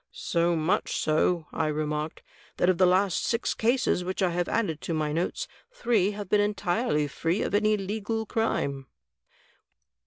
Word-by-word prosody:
"So 170 0 0
much 160 +2 0
so," 160 +2 +1
I 160 - 0
remarked, 150 +1 -3 0.3
"that 175 - +3
of 185 -1 +2
the 185 - +6
last 185 0 +2
six 230 0 0
cases 235 -5 +1
which 185 +2 -2
x 180 -2 +1
have 175 0 -1
added 165 -10 -1
to 165 - -2
my 155 -1 -1
notes, 175 - -2 0.2
three 235 - +1
have 205 -2 -5
been 205 +2 +3
entirely 205 -5 0
free 165 +7 -1
of - - -3
any 215 +1 +3
legal 215 +3 -3
crime." 140 -12 -1
180 Hz, 160 wpm, -27 LUFS, 160-210 Hz, 0.3 s, the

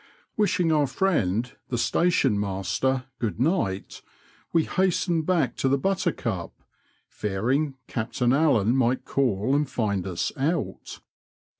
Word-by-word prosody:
Wishing 180 -5 +2
our 150 -2 +3
friend 125 - 0
the 120 - -1
station 135 -5 +2
master 105 +7 -1
good 110 -4 -2
night, 125 - -1 0.5
we 165 -1 +3
hastened 175 -3 0
back 180 -3 +1
to 135 - +1
the 140 - +3
Buttercup, 140 - -2 0.5
fearing 125 +9 -1
Captain 120 +2 -1
Allen 130 -7 +3
might 130 -1 +1
call 125 -2 +1
and 145 -2 +1
find 100 -7 -1
us 85 -2 -2
out." 155 +5 -2
130 Hz, 120 wpm, -25 LUFS, 105-160 Hz, 0.5 s, our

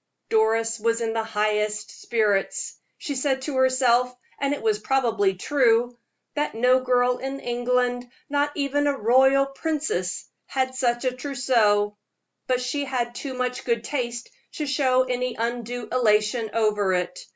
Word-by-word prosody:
Doris 225 +1 +2
was 230 +1 +1
in 225 -1 -1
the 225 0 -1
highest 210 -1 -1
spirits. 215 - 0 0.2
She 285 - -4
said 265 0 -1
to 275 -1 -3
herself 255 -1 +3 0.3
and 280 0 0
it 290 - -3
was 215 -2 +1
probably 220 -5 +1
true 240 +1 +2 0.4
that 295 -5 -2
no 250 +3 +4
girl 250 -1 +2
in 270 +1 -4
England, 245 0 -1 0.2
not 290 0 0
even 290 0 0
a 280 -1 0
royal 265 +4 +4
princess, 275 - -2 0.2
had 260 -1 -1
such 245 -1 0
a 255 - +2
trousseau; 235 -6 +1 0.5
but 255 -1 +1
she 285 +3 -2
had 245 -3 -2
too 260 +1 -6
much 250 0 -2
good 235 -2 0
taste 240 -3 -4 0.2
to 300 - -3
show 260 -2 +2
any 250 -1 -2
undue 235 0 -3
elation 220 -1 +2
over 210 -3 +1
it. 180 0 -2
245 Hz, 150 wpm, -24 LUFS, 225-265 Hz, 0.5 s, no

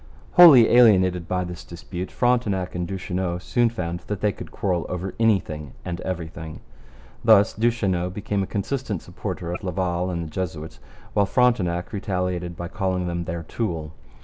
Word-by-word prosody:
Wholly 145 -10 +9
alienated 95 -8 +5
by 90 0 -1
this 90 0 -7
dispute, 90 +2 -7
Frontenac 110 -7 0
and 90 -1 -3
Duchesneau 90 -1 -3
soon 120 +6 +1
found 85 -7 -4
that 105 -2 -3
they 105 +1 +1
could - - -9
quarrel 90 -4 -1
over 90 +1 -4
anything 80 - 0
and 85 0 -4
everything. 80 -3 -6 0.6
Thus 110 -2 +6
Duchesneau 105 -6 0
became 100 +1 -2
a 95 - -2
consistent 105 - -3
supporter 85 0 -5
of 90 - -6
Laval 90 -1 -1
and 85 -2 -3
the 80 - -9
Jesuits, 80 -3 -5 0.3
while 100 -1 +2
Frontenac 100 -6 +1
retaliated 90 -3 -2
by 85 - -4
calling 95 -2 -2
him 85 -1 -3
their 85 0 -4
tool. 80 -5 -4
90 Hz, 155 wpm, -24 LUFS, 85-105 Hz, 0.6 s, Wholly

